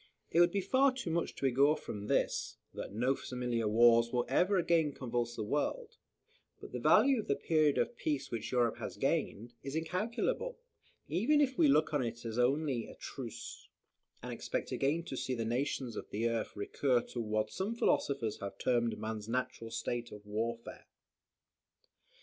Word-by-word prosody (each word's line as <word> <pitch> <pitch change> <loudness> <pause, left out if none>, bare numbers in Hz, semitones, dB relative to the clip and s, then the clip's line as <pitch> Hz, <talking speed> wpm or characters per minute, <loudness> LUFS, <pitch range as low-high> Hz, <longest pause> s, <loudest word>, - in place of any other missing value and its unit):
It 170 - +3
would 175 - +7
be 200 - 0
far 260 +8 +4
too 250 -10 -4
much 170 0 -1
to - - -3
augur 140 +4 +4
from 105 -1 -6
this, - - 0 0.2
that - - -6
no 120 +6 +1
similar 125 -4 -2
wars 115 +1 +5
will 125 -1 +1
again 170 -1 +2
convulse 120 -2 -2
the 110 - -3
world; 450 - -2 0.6
but - - -10
the - - -4
value 270 -3 +5
of 215 - -5
the 140 - +2
period 150 0 +2
of 240 - 0
peace 140 -3 -2
which 115 -2 -4
Europe 120 -3 +2
has - - -6
gained, 115 +4 -1
is 135 +2 -5
incalculable; 225 - -1 0.5
even 290 +10 +2
if 270 -3 +2
we 325 - +5
look 155 - +3
on 145 -3 +2
it 115 0 -5
as 115 +1 -3
only 135 -1 +1
a - - -11
truce, - - -8 0.5
and - - -4
expect - - -3
again 150 +5 +1
to 150 - -6
see 130 0 -2
the 115 -1 -2
nations 125 0 -1
of - - -6
the 110 +3 0
earth 115 -1 -2
recur 120 +5 +1
to 120 - -5
what 110 -1 -1
some 205 +5 -2
philosophers 135 - +1
have 100 -1 -6
termed 120 -2 +1
man's 110 -1 -5
natural 125 -1 -2
state 120 +1 -3
of 105 0 -11
warfare. 115 +3 -4
130 Hz, 175 wpm, -33 LUFS, 115-165 Hz, 0.6 s, would